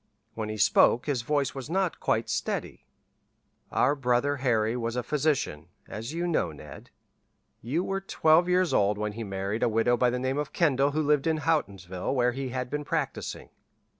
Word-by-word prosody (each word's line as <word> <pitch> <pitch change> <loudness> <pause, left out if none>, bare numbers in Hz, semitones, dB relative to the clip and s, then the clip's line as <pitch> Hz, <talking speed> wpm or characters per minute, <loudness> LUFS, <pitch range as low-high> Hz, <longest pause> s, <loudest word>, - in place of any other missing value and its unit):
When 110 -1 -4
he 110 - -4
spoke 120 +3 +4
his 140 -5 -1
voice 140 +3 0
was 135 +1 -7
not 185 0 0
quite - - 0
steady. - - -3 0.8
"Our 135 +3 +3
brother 135 +1 +1
Harry 115 -4 +1
was 115 -1 -3
a 125 - -1
physician, 140 - -1 0.2
as 115 +5 -6
you 170 +2 -2
know, 160 - 0
Ned. 75 -2 -12 0.7
You 145 +10 -1
were 195 0 -2
twelve 170 -2 +3
years 180 -1 +2
old 100 +1 +2
when 105 0 -2
he 115 +2 -6
married 100 +2 -3
a - - +3
widow 115 +2 +2
by 125 +1 +2
the 125 - -1
name 130 +3 -1
of 150 - -4
Kendall 140 -4 +2
who 155 +1 +1
lived 150 0 +2
in 160 -1 +1
Houghtonsville 100 - -1
where 125 -1 +3
he 135 +1 -4
had 125 0 -3
been 150 0 -2
practising. 150 -2 -3
130 Hz, 185 wpm, -27 LUFS, 110-150 Hz, 0.8 s, spoke